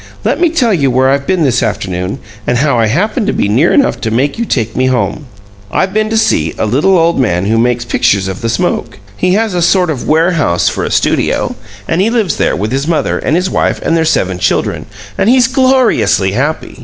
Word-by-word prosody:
"Let - - 0
me 345 - +4
tell 255 -9 +1
you 140 -7 +1
where 130 +1 +2
I've 140 0 -1
been 185 -3 +1
this 125 -3 +1
afternoon 95 -2 -3 0.3
and 120 - +1
how 135 -2 +1
I 115 - +2
happened 210 - -1
to 210 - 0
be - - 0
near 125 +11 +2
enough 280 - +1
to 115 - -1
make 135 - -1
you 235 - -1
take 115 - -2
me 130 +1 +1
home. 125 +2 -1 0.4
I've 190 0 0
been 215 0 0
to 225 - 0
see 80 - +1
a - - -1
little 145 - +2
old 165 -1 +1
man 90 -7 0
who 110 +2 +1
makes 120 0 0
pictures 100 -4 +1
of 95 0 -6
the 115 - -2
smoke. 115 - -2 0.2
He 180 0 0
has 220 -1 0
a 175 - -1
sort 180 0 +2
of 135 -5 -5
warehouse 160 - +1
for - - -4
a - - -2
studio, - - 0 0.3
and 165 +3 0
he 210 - +2
lives 220 -9 0
there - - +1
with 105 +3 -3
his 135 +3 -2
mother 165 -2 0
and 150 - -1
his 180 +2 0
wife - - -1
and 165 - +1
their 165 - +2
seven 95 - 0
children, 95 - -1 0.3
and 205 - +2
he's 250 0 +4
gloriously 255 - +2
happy. 145 +10 -3
145 Hz, 230 wpm, -12 LUFS, 115-190 Hz, 0.4 s, me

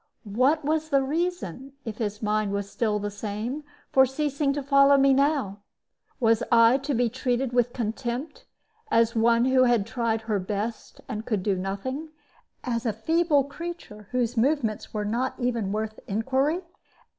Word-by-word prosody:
What 280 +6 +2
was 315 +1 0
the 275 -2 +3
reason, 280 - -3
if 220 -2 -6
his 210 -1 -3
mind 210 -1 0
was 200 0 -2
still 215 -3 0
the 205 0 -3
same, 215 +7 -4 0.3
for 265 0 +6
ceasing 280 +1 -1
to 285 0 -3
follow 275 0 +5
me 275 0 +5
now? 275 -8 +1 0.6
Was 230 -2 +3
I 230 +2 +6
to 275 0 -2
be 245 +1 +2
treated 250 +1 -1
with 245 -1 +2
contempt 240 +4 -4 0.4
as 230 0 +3
one 230 +1 +4
who 260 0 +4
had 240 -5 +3
tried 230 -2 -1
her 220 -2 -1
best 210 +4 -4
and 215 +1 -4
could 210 -6 -1
do 200 -1 +1
nothing, 200 +12 -4 0.5
as 235 -1 -2
a 220 - +1
feeble 310 - +2
creature 280 - -8
whose 245 -1 -1
movements 235 -3 0
were 210 -1 -3
not 240 +5 -1
even 235 -5 -1
worth 215 +1 -3
inquiry? 265 - 0
240 Hz, 160 wpm, -26 LUFS, 215-275 Hz, 0.6 s, for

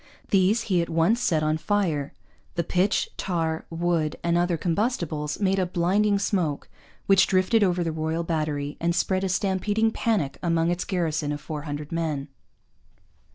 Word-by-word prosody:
These 200 +3 +3
he 185 -4 +1
at 170 - -3
once 165 +9 +2
set 155 -8 +1
on 155 +1 +1
fire. 155 -5 0 0.4
The 170 - 0
pitch, 185 +4 +1
tar, 165 -3 -2
wood, 165 -2 0
and 170 0 +1
other 175 0 +1
combustibles 165 - -1
made 195 -1 +2
a 185 - +2
blinding 195 +4 +2
smoke, 180 -7 -1 0.4
which 195 -1 +5
drifted 190 +4 +3
over 180 -2 +1
the 165 - -1
Royal 160 +1 -2
Battery 150 -3 -2
and 170 0 0
spread 185 +1 +1
a 190 - 0
stampeding 205 +4 +1
panic 210 -12 -1
among 165 -1 +1
its 175 0 -2
garrison 160 -5 -1
of 145 - -3
four 150 -1 -6
hundred 145 0 -5
men. 155 -4 -2
170 Hz, 160 wpm, -25 LUFS, 155-190 Hz, 0.4 s, which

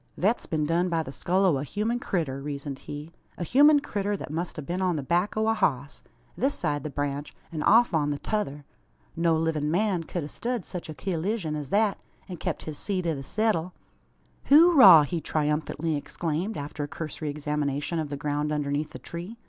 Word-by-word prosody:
"Thet's 210 +6 +1
been 155 -2 0
done 170 +3 +1
by 165 -1 0
the 135 - -8
skull 185 +7 +1
o' 170 -7 +3
a - - -3
human 215 - -1
critter," 155 - -2
reasoned 140 -1 -5
he 150 +2 -8 0.3
"a - - -3
human 290 - +6
critter, 205 -6 -2
that 150 - -7
must 170 +3 -3
a 150 - -4
been 175 +6 -3
on 180 -2 +1
the 145 - -3
back 175 +9 0
o' 220 0 +2
a 225 - +4
hoss 140 - -1 0.3
this 270 +4 0
side 145 -3 -1
the 155 - -5
branch, 145 0 -3 0.2
an 155 -2 -4
off 235 +2 +5
on 150 -2 +2
the 145 - -1
t'other. 145 -7 -3 0.5
No 165 0 +2
livin' 160 -2 0
man 185 0 +1
ked 175 -1 -4
a - - -5
stud 235 +4 -3
sech 180 -3 -7
a 155 - -6
cullizyun 180 -1 -2
as 145 -3 -5
thet, 205 +1 +2 0.3
an 180 - -7
kep - - -3
his 155 -2 -7
seat 185 -3 -2
i' 165 - +1
the 140 - -5
seddle. 185 +1 0 0.8
"Hooraw!" 290 - +9
he 165 +3 -3
triumphantly 155 +1 -1
exclaimed, 165 +7 -3
after 145 +1 -5
a - - -3
cursory 155 0 -5
examination 150 +1 -2
of 155 -2 -3
the 145 - -4
ground 150 +1 -1
underneath 145 0 -1
the - - -6
tree. 175 +7 -8
160 Hz, 205 wpm, -27 LUFS, 145-195 Hz, 0.8 s, Hooraw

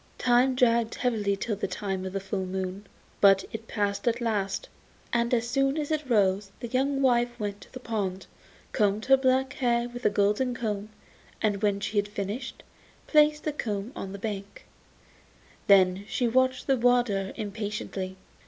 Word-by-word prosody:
Time 250 +1 +3
dragged 235 -2 +2
heavily 210 -5 0
till 210 +2 -2
the 205 - -3
time 190 0 -3
of 190 - -5
the 195 - -1
full 190 -1 -3
moon, 190 +2 -4 0.3
but 195 -1 +5
it 225 0 -6
passed 205 +2 -2
at 235 0 +2
last, 210 -5 -1 0.5
and 235 0 +1
as 235 -1 +1
soon 275 +3 +1
as 300 0 -2
it 305 -3 -2
rose 200 -3 +2
the 240 - -5
young 270 +2 0
wife 240 -1 +2
went 205 -1 -4
to - - -15
the 255 - -8
pond, 200 -6 -3 0.5
combed 210 0 +1
her 270 - +7
black 265 0 +1
hair 240 -2 +1
with 245 0 -9
a - - +4
golden 210 +5 +1
comb, 215 -3 -3 0.5
and 205 -2 0
when 205 -2 +1
she 205 +1 -3
had 205 0 +2
finished, 205 +5 -5 0.4
placed 300 -1 +4
the 305 - -2
comb 210 -4 -3
on 190 - -6
the 200 - -6
bank; 200 -1 -6 1.0
then 190 -1 +5
she 240 +1 0
watched 260 +2 +2
the 270 -1 +2
water 235 -6 +2
impatiently. 205 -3 -4
220 Hz, 170 wpm, -27 LUFS, 200-245 Hz, 1.0 s, her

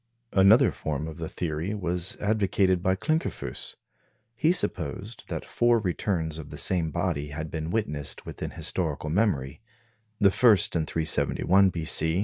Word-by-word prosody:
Another 100 +4 +6
form 75 0 -4
of 80 - -8
the 80 -1 -5
theory 85 +4 -3
was 90 -2 -2
advocated 100 -3 +1
by 95 0 +2
Klinkerfues. 155 - -3 0.6
He 155 +8 +3
supposed 100 - -1
that - - -4
four 120 0 +2
returns 85 -5 -2
of 75 - -9
the - - -8
same 85 -4 +1
body 85 -3 -2
had 75 +2 -6
been 80 0 -4
witnessed 75 -9 -2
within - - -6
historical 75 - -2
memory 80 -9 0 0.6
the 100 -2 +5
first 105 -6 +4
in 80 -2 0
371 90 +4 +2
b.c. 80 0 +1
90 Hz, 140 wpm, -26 LUFS, 80-100 Hz, 0.6 s, Another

